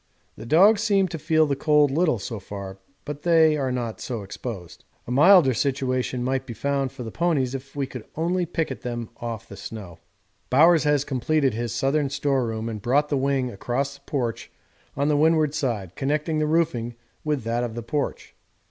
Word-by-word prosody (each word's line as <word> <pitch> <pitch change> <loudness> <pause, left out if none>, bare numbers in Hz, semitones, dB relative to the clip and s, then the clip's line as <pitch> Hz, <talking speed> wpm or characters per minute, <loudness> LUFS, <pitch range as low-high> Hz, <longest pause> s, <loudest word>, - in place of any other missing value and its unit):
The 115 - -10
dogs 200 - +5
seem 200 -3 +2
to 165 - -5
feel 155 +1 +3
the 140 -2 0
cold 150 0 +3
little 155 -2 +2
so 110 +2 -6
far, 95 -1 -8 0.3
but 145 0 -6
they 160 -2 +4
are 135 -3 -1
not 120 -3 -3
so 115 -5 -4
exposed. 95 -3 -8 0.2
A - - -6
milder 150 +1 +6
situation 130 -1 -1
might 130 +1 -1
be 120 - -6
found 140 +1 -1
for 125 - -8
the 110 - -6
ponies 150 -6 0
if 135 +1 -8 0.4
only 165 +3 0
we - - 0
could - - -28
picket 160 -7 -2
them 120 -2 -5
off 115 -3 -6
the 100 - -10
snow. 95 -6 -9 0.5
Bowers 160 +4 +5
has 145 -1 +3
completed 135 0 +1
his 115 +1 -3
southern 135 +4 0
storeroom 130 -6 -1
and 110 -2 -5
brought 140 +6 +2
the 145 - +1
wing 135 -2 0
across 130 +7 -2
the 140 - -16
porch 120 -5 -3 0.5
on 140 +1 +1
the 150 - +2
windward 155 0 +3
side, 110 - -2
connecting 150 +3 -1
the 155 - +1
roofing 150 -8 0 0.3
with 150 -5 -1
that 115 +2 -1
of 115 -2 -4
the 120 - -5
porch. 145 +5 -3
135 Hz, 190 wpm, -24 LUFS, 120-150 Hz, 0.5 s, milder